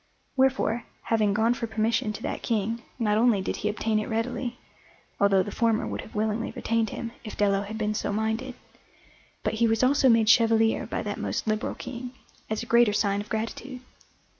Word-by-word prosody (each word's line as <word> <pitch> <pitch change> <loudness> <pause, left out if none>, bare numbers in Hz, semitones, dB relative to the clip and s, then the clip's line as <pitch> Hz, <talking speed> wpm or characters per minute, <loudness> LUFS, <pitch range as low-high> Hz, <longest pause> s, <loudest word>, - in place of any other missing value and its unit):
Wherefore, 265 -3 +2 0.2
having 215 -3 +2
gone 225 +2 +3
for 235 -1 -4
permission 220 +1 0
to 215 - -8
that - - -3
King, 225 +1 -1 0.2
not 215 -3 +2
only 230 -3 +4
did 190 - -3
he 210 - -1
obtain 215 +1 0
it 215 - -4
readily 240 +2 -2 0.6
(although 195 -2 +4
the 205 - -6
former 225 0 +1
would - - -4
have - - -13
willingly 215 +1 -1
retained 225 -1 0
him, 230 +2 -5
if 215 - -8
Dello 200 -1 +2
had 210 +2 -6
been 215 -1 0
so 210 - -2
minded), 220 +4 -2 0.9
but - - 0
he 230 - +5
was 225 +2 +1
also 270 +1 +4
made 225 -2 +4
chevalier 225 0 +4
by - - -3
that - - -4
most - - -2
liberal 215 -1 -1
King, 250 0 -7 0.4
as 220 +1 -2
a - - -7
greater 235 -2 +4
sign 200 -1 +1
of 210 - -11
gratitude. 245 +3 -4
225 Hz, 190 wpm, -26 LUFS, 215-235 Hz, 0.9 s, he